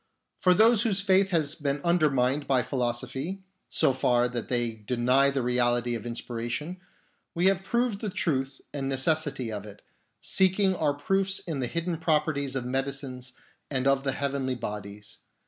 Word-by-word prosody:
For 180 -1 +4
those 225 +2 +5
whose 210 -5 +1
faith 195 -1 +3
has 155 -5 +1
been 145 -2 -2
undermined 145 -5 +2
by 130 -2 +3
philosophy, 130 +8 -3 0.3
so 135 - +2
far 125 -1 +2
that 120 -2 -4
they 120 -2 +1
deny 125 +5 +2
the 135 -2 -1
reality 120 0 +1
of 115 0 -4
in 120 - -3
spiration, 120 +9 -4 0.6
we 175 +2 +1
have 195 -1 +3
proved 235 0 0
the 215 - -2
truth 135 -7 -2
and 135 -2 -3
necessity 135 -3 0
of 105 -2 -5
it, 105 -1 -12 0.4
seeking 190 - +3
our 150 -4 0
proofs 195 +6 +1
in 160 -5 -4
the 125 - -1
hidden 170 +4 -2
properties 150 -4 0
of 130 -2 -2
medicines 130 -1 -4 0.4
and 130 -2 -1
of 135 0 +3
the 135 -1 0
heavenly 135 -2 -2
bodies. 105 -3 -7
135 Hz, 165 wpm, -27 LUFS, 125-170 Hz, 0.6 s, those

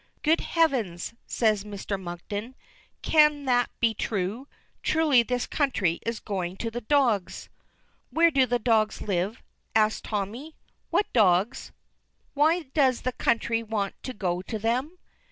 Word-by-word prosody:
"Good 315 +2 +3
heavens!" 235 - 0
says 215 -4 +1
Mr. 200 -1 -5
Monkton. 205 +7 -6 0.5
"Can 300 -2 +4
that 245 -2 +2
be 230 -2 +2
true? 210 +5 -3 0.3
Truly 310 -6 +4
this 245 +1 -2
country 200 - 0
is 230 -1 -3
going 185 -3 -4
to 230 +2 -3
the 240 +2 -5
dogs." 235 -7 +1 0.6
"Where 335 +1 +4
do 265 -3 +3
the 245 +1 +1
dogs 220 -2 +1
live?" 195 +4 -2 0.3
asks 215 0 +3
Tommy, 225 +9 -4 0.3
"What 415 - 0
dogs? 200 0 +2 0.6
Why 320 +4 +3
does 265 -5 +3
the 255 - 0
country 230 0 0
want 215 -3 -2
to 255 - -6
go 180 -3 -1
to 220 +4 -5
them?" 250 - -1
230 Hz, 135 wpm, -26 LUFS, 205-265 Hz, 0.6 s, Can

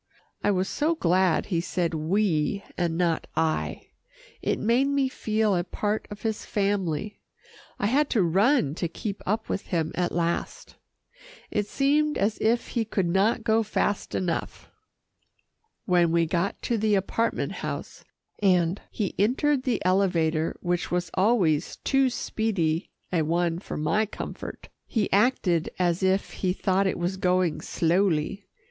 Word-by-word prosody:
I - - +3
was 190 -1 +1
so 310 +3 0
glad 185 - +2
he 170 -4 0
said 175 -1 -1
"we" 170 +2 0
and 170 -2 -1
not 170 -2 0
"I." 160 -1 -1 0.5
It - - 0
made 240 +5 +2
me 280 -1 +1
feel 215 -4 0
a 175 - +1
part 210 +4 -2
of 205 0 -9
his 220 -1 -2
family. 200 -2 -1 0.6
I - - -1
had 275 +7 +2
to 215 -6 +2
run 190 - +3
to 170 - +1
keep 200 +4 -5
up 220 +3 0
with 195 - -3
him 165 -3 -1
at 180 -1 -1
last. 170 0 -2 0.8
It 210 -1 0
seemed 295 +5 +2
as 205 +2 0
if 230 +2 +1
he 235 - 0
could 200 -4 -1
not 200 +6 +2
go 225 0 +3
fast 205 -1 -1
enough. 175 -3 -3 1.1
When 175 -3 +3
we 170 0 +3
got 170 +4 -1
to 235 -2 0
the 215 0 +2
apartment 225 +4 0
house, - - -6 0.4
and 180 -2 +2
he 205 -5 -3
entered 260 +6 +2
the 250 -7 -1
elevator 170 -4 +1
which 175 0 -1
was 175 -1 -1
always 185 -7 +2
too 270 -1 +2
speedy 195 -9 -1 0.2
a 170 - +3
one 170 +2 0
for - - -6
my 210 +8 +1
comfort, - - -7 0.2
he 220 -4 -1
acted 195 -6 +2
as 175 -1 +1
if 190 +1 +1
he 185 -2 -1
thought 190 0 +1
it - - -1
was 175 +2 -2
going 180 -3 +1
slowly. 175 +2 0
190 Hz, 150 wpm, -26 LUFS, 170-220 Hz, 1.1 s, I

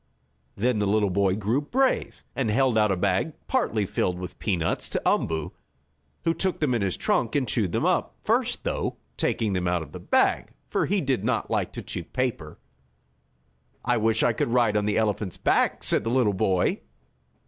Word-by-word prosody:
Then 115 +2 +1
the 105 - +1
little 105 -1 +2
boy 95 0 +2
grew 110 +7 0
brave, 260 - 0
and 130 -5 0
held 130 +2 +2
out 105 -2 +3
a - - +2
bag, 95 - 0
partly 115 - 0
filled 90 -1 -1
with 90 -1 -8
peanuts, 85 -6 -1
to - - -2
Umboo, 80 -2 0 0.7
who 165 - +2
took 190 +1 -1
them 150 -5 +1
in 115 - 0
his 95 -2 0
trunk, 115 +2 0
and 135 -3 +1
chewed 105 -4 0
them - - 0
up, - - +1
first, - - 0
though, - - -2 0.2
taking 110 -3 0
them 90 -1 -1
out 90 -2 0
of 75 - -13
the - - -8
bag, - - +1 0.2
for - - +1
he 200 0 +1
did 130 -7 0
not 115 +1 -1
like - - 0
to - - -6
chew 85 - -5
paper. 115 - -3 1.3
"I - - +2
wish 110 0 +2
I 120 - +3
could 115 - -1
ride 120 -3 +2
on 105 -1 +1
the 105 - +1
elephant's 105 -4 -1
back!" - - +1
said - - +3
the 115 - -2
little 120 -4 +2
boy. 95 -1 +1
105 Hz, 190 wpm, -26 LUFS, 95-125 Hz, 1.3 s, out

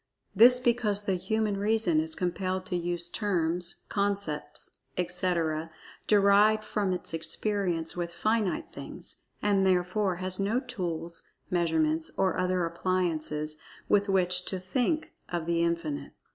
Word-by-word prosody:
This 250 +2 +8
because 230 -5 +2
the 200 -2 0
human 215 +2 0
reason 205 -5 +2
is 160 0 -1
compelled 185 +1 -2
to 185 - -3
use 175 0 -1
terms, 175 -3 -1
concepts, 200 -8 -2 0.2
etc., 175 -3 0 0.4
derived 210 +1 +5
from 205 -3 -1
its 180 -2 -3
experience 170 -1 -1
with 175 -1 -3
finite 215 +1 0
things, - - -9 0.2
and 200 -2 +3
therefore 185 +1 +2
has 185 +1 -2
no 205 +5 +1
tools, 170 -9 -4 0.3
measurements, 160 -2 +1
or 190 -1 +1
other 185 -1 +1
appliances 165 -3 -1 0.3
with 205 0 +3
which 180 -1 +2
to 190 - -1
"think" 255 - -1 0.2
of 170 -2 -2
The 170 0 +1
Infinite. 170 -3 -2
185 Hz, 130 wpm, -29 LUFS, 170-205 Hz, 0.4 s, This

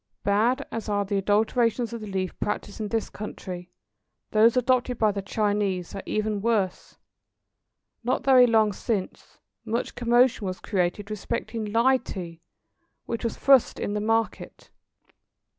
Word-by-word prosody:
Bad 230 +7 +2
as 225 -1 -4
are 205 -1 0
the 200 0 0
adulterations 225 +4 +1
of 230 - -5
the 215 - -7
leaf 190 -2 -2
practised 205 0 -3
in 215 - -2
this 225 +1 -1
country, 180 -4 -7 0.6
those 225 +2 +5
adopted 250 0 +1
by 215 -2 +3
the 200 0 -4
Chinese 200 -3 -1
are 195 - -5
even 215 -1 -1
worse. 205 -5 -1 1.1
Not 245 +2 0
very 255 -2 +7
long 220 -3 +3
since, 195 -1 -4 0.3
much 230 +2 -2
commotion 240 -2 +2
was 185 0 -4
created 200 +1 -2
respecting 225 +1 -3
"Lie 230 +5 +3
Tea," 170 -8 -8 0.6
which 230 +1 -4
was 230 - -2
thrust 270 -3 +4
in 205 - -2
the 210 - -1
market. 225 +1 -2
215 Hz, 140 wpm, -26 LUFS, 200-235 Hz, 1.1 s, very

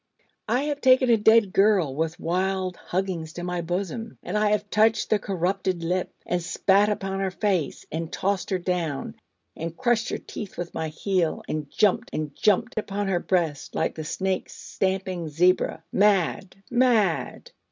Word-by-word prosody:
I 245 +5 +1
have 290 -1 -2
taken 255 -1 +5
a - - +7
dead 220 -2 +4
girl 195 -8 +3
with 160 +3 -2
wild 185 +1 -1
huggings 175 -4 -3
to 175 - -6
my 180 -1 -2
bosom; 195 +7 -4
and 180 - -4
I 210 0 +3
have 210 0 0
touched 220 +1 +3
the 215 - +4
corrupted 185 -1 -1
lip, 180 +2 -1
and 180 0 -1
spat 190 +4 +3
upon 195 -2 -2
her 195 -1 0
face, 185 -6 -1
and 165 +1 -4
tossed 195 -1 -1
her 190 - +1
down, 175 -6 -2 0.4
and 165 +1 -5
crushed 240 -2 +1
her - - -2
teeth 205 - -8
with 175 -1 -5
my 160 0 -2
heel, 170 +1 -1
and 150 -2 -3
jumped 205 -3 +2
and 150 -2 -3
jumped 220 +3 +2
upon 205 -1 -3
her 180 -2 +1
breast, 170 -6 -1
like - - 0
the 155 - -6
snake 190 +4 -2
stamping 190 -3 -3
zebra, 170 +1 +2
mad, 195 -2 +2 0.2
mad...! 240 -8 +1
190 Hz, 165 wpm, -25 LUFS, 170-210 Hz, 0.4 s, a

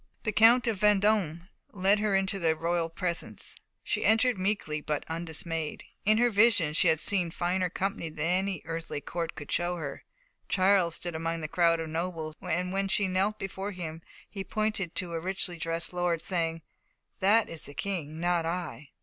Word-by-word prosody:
The 215 - 0
Count 230 +4 +6
of 225 -5 0
Vendôme 205 -5 +3 0.3
led 200 +1 +3
her 210 -2 +1
into 195 +1 +1
the 165 -2 +2
royal 165 +1 0
presence. 170 0 -2 0.3
She - - -1
entered 225 +3 +4
meekly, 185 -6 -1
but 150 -1 -2
undismayed; 165 -1 -3 0.2
in 215 +1 +5
her 240 +1 +3
visions 205 -8 +4
she - - +4
had 160 -2 +4
seen 180 -1 +2
finer 180 +2 0
company 190 -2 -2
than 155 0 -4
any 185 0 0
earthly 165 -2 -4
court 165 +2 -4
could 145 - -8
show 175 +1 0
her. 145 -5 -6 0.5
Charles 185 -3 +3
stood 175 0 -4
among 165 +1 -2
the 155 - -3
crowd 170 +1 +3
of 160 -1 -4
nobles, 165 -1 -3
and 180 +3 -1
when 195 0 0
she 195 0 +2
knelt 195 +3 +1
before 195 +1 -5
him 165 -3 -6 0.3
he 195 -2 -6
pointed 215 -4 -2
to 175 -2 -1
a 165 - -1
richly 185 0 -2
dressed 165 +2 -3
lord, 175 -2 0
saying: 165 -3 -1 0.6
"That 210 +4 +4
is 165 - -4
the 145 - -12
King, 160 -6 -3
not 175 0 +1
I." 165 -3 -4
175 Hz, 180 wpm, -29 LUFS, 165-195 Hz, 0.6 s, Count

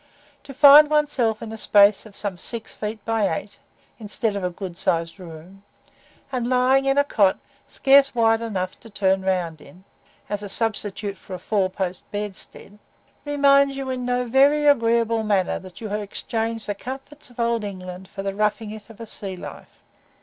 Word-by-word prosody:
To 275 - -9
find 290 +2 +9
oneself 280 -8 +1
in 220 - -7
a 225 - -8
space 205 +1 +4
of 200 - -17
some 205 -3 -3
six 225 +5 -4
feet 215 0 -6
by 225 -3 +1
eight, 205 - -10 0.4
instead 215 0 -2
of 200 - -3
a 180 - 0
good 180 0 -7
sized 165 0 -1
room, 175 +2 -12 0.7
and 245 -2 -2
lying 260 +2 +3
in 270 0 +2
a 285 - +5
cot, 205 -9 +2 0.3
scarce 275 -1 +4
wide 225 -1 +3
enough 190 -5 -4
to 225 - -14
turn 190 -2 +1
round 180 -5 -2
in, 175 +7 -16 0.4
as 205 0 -3
a 205 - -7
substitute 205 -2 -2
for 185 - -9
a - - -5
four 190 +1 0
post 185 -1 -4
bedstead, 205 0 -7 0.5
reminds 280 -1 +3
you 270 -1 -4
in 255 -1 -3
no 250 0 0
very 280 +5 +4
agreeable 230 -4 +3
manner 205 -4 0
that 185 +2 -13
you 220 - -5
have 210 +1 -2
exchanged 225 +2 -4
the 205 - -2
comforts 270 +7 -9
of 245 - -17
Old 235 -1 0
England 185 -2 -7
for 195 0 -7
the 195 0 -2
"roughing 210 +1 -1
it" 215 -1 -10
of 225 - -14
a 230 - -7
sea 195 -3 -6
life. - - -11
215 Hz, 185 wpm, -23 LUFS, 195-245 Hz, 0.7 s, find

